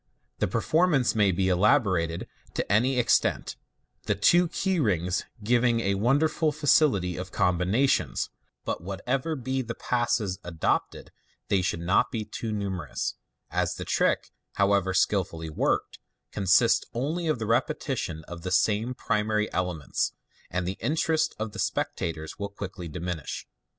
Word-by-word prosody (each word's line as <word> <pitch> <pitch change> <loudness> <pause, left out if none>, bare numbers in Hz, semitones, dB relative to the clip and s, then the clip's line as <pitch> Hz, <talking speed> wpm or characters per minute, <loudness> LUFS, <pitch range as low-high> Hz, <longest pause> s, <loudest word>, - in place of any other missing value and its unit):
The - - +2
performance 155 -6 +2
may 105 -3 +3
be 95 +1 0
elaborated 95 - +2 0.3
to - - -2
any 125 +6 +3
extent, 120 -2 +2 0.5
the - - +2
two 175 - +4
key 185 +2 0
rings 90 - 0 0.2
giving 120 +1 +3
a 100 -2 +1
won 120 +8 +3
deiful 155 0 +1
facility 135 - +3
of 90 +1 -6
com 90 -1 +1
bination, 110 +10 +1 0.4
but - - -2
what 95 +2 -6
ever 135 +5 0
be 130 0 -2
the 115 -2 -5
passes 115 -6 0
adopted 85 -2 -2 0.4
they 100 -2 +3
should 85 -2 -1
not 90 +3 +2
be 110 -4 -3
too 115 +1 -5
numerous, 95 -8 -3 0.4
as - - 0
the - - -6
trick, - - +1 0.2
however 100 -1 +2
skilfully 85 -6 0
worked, - - 0 0.3
consists 100 +4 +4
only 160 +8 -1
of 155 -6 +1
repetitions 80 -6 -1
of 85 -1 -8
the 90 - -4
same 110 +5 +1
primary 105 -2 0
ele 90 -1 0
ments, 75 -3 -2 0.4
and 90 0 -2
the 95 - -4
interest 160 +1 +1
of 110 0 -3
the - - -9
spectators 80 +1 -2
will 100 0 -3
quickly 100 -3 -7
diminish. 85 -1 -5
105 Hz, 145 wpm, -27 LUFS, 90-125 Hz, 0.5 s, two